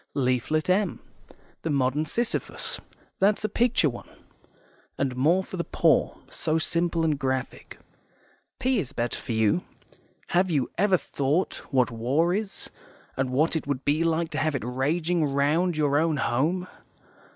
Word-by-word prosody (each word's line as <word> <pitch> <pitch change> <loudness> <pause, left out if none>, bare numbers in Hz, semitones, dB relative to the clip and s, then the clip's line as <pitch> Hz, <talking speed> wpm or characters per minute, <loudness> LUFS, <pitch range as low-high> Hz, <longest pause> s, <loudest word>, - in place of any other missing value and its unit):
Leaflet 130 +3 +1
M, 190 0 +1 0.6
the 165 - -3
Modern 140 +1 +1
Sisyphus 235 +8 -2 0.4
that's 205 +2 +3
a - - +2
picture 235 -5 +2
one, 120 -4 -6 0.9
and 135 -2 -1
more 165 +9 +3
for 185 - -8
the 170 - -1
poor; - - +2
so 155 - -1
simple 170 +1 0
and 155 -3 +1
graphic. 130 -2 -3 0.8
P 260 -2 +2
is 145 -10 -4
better 120 0 -2
for 115 - -4
you. 110 +10 +2 0.7
HAVE 180 +1 +2
YOU 145 -6 0
EVER 195 -1 +4
THOUGHT 145 +4 -1
what 130 -2 +2
war 135 +10 +1
is, 205 0 -3 0.4
and 130 -1 -1
what 150 +6 +2
it 160 - -2
would 140 -2 -2
be 150 +3 +2
like 165 0 0
to - - -2
have 155 -2 0
it 125 - -2
raging 155 +7 0
round 150 +5 +1
your 145 -1 +3
own 160 -1 +1
home? 155 +9 0
155 Hz, 150 wpm, -26 LUFS, 135-175 Hz, 0.9 s, EVER